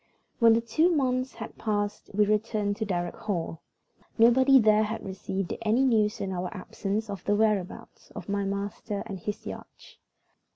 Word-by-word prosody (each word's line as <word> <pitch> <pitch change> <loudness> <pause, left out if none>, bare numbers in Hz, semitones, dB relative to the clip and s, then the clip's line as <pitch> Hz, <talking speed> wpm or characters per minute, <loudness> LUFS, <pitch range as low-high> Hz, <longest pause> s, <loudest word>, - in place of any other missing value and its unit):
WHEN 230 -2 +7
the 230 - +2
two 275 +10 +2
months 260 -5 0
had 220 - -9
passed 205 -1 -2
we 210 0 +4
returned 210 -1 0
to 220 - -3
Darrock 175 -3 -2
Hall. 175 -7 -3 0.6
Nobody 260 +4 +6
there 215 -3 +5
had 220 +1 -3
received 190 -1 -4
any 230 +4 +2
news 215 -4 +2
in 195 - -3
our 180 -1 -3
absence 205 +2 -4
of 200 -2 -6
the 205 - +2
whereabouts 210 -4 -1
of - - -7
my 200 0 -1
master 200 +1 -3
and 195 -4 -6
his 205 +4 -5
yacht. - - -10
210 Hz, 165 wpm, -27 LUFS, 200-230 Hz, 0.6 s, WHEN